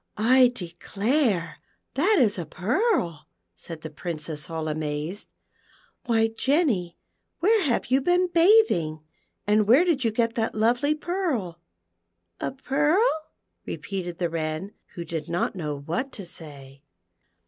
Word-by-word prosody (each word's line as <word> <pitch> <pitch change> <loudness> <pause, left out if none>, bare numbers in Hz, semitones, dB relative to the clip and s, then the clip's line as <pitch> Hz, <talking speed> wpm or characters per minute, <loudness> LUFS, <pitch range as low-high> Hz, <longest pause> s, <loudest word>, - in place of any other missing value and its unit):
" - - -47 0.2
I 255 -2 +6
declare 195 - -1 0.3
that 375 +10 +3
is 210 -7 +2
a 170 - -3
pearl," 180 - 0 0.3
said 155 - -9
the 160 - -7
Princess, 155 -2 -5
all 160 -1 -3
amazed. 155 +4 -3 0.4
" - - -34
Why, 225 -2 +3
Jenny, 225 - 0 0.4
where 425 +5 +3
have 250 -2 0
you 265 +1 +4
been 355 +5 +3
bathing, 330 - +4 0.4
and 210 0 +3
where 265 +11 +6
did 315 -7 +1
you 230 - +3
get 230 +1 0
that 225 -2 -1
lovely 245 +7 +2
pearl 305 - -2 0.8
V - - -2
"A - - -3
pearl 275 +4 +1
1" - - +4 0.7
repeated 180 -3 -5
the 170 -2 -1
Wren, 160 +4 -3 0.2
who 170 - -5
did 160 -3 -5
not 175 +1 0
know 150 -5 -4
wliat 230 - -3
to 195 - -7
say. 140 -5 -8
205 Hz, 145 wpm, -25 LUFS, 165-270 Hz, 0.8 s, I